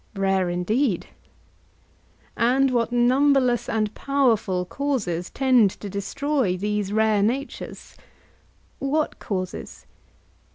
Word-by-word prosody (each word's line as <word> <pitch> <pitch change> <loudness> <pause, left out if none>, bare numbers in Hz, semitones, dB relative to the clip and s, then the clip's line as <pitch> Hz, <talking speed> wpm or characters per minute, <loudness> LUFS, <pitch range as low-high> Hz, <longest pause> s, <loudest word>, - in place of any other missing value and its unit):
Rare 195 -2 +1
indeed. 190 +5 0 1.3
And 260 +3 +2
what 240 -1 0
numberless 250 0 +3
and 215 -1 -1
powerful 225 -10 +1
causes 205 -9 -2
tend 255 -6 +4
to 205 - -7
destroy 250 0 -1
these 205 0 -2
rare 215 -1 +2
natures! 250 +7 -3 0.8
What 300 +3 -1
causes? 185 -3 -5
225 Hz, 90 wpm, -24 LUFS, 195-270 Hz, 1.3 s, tend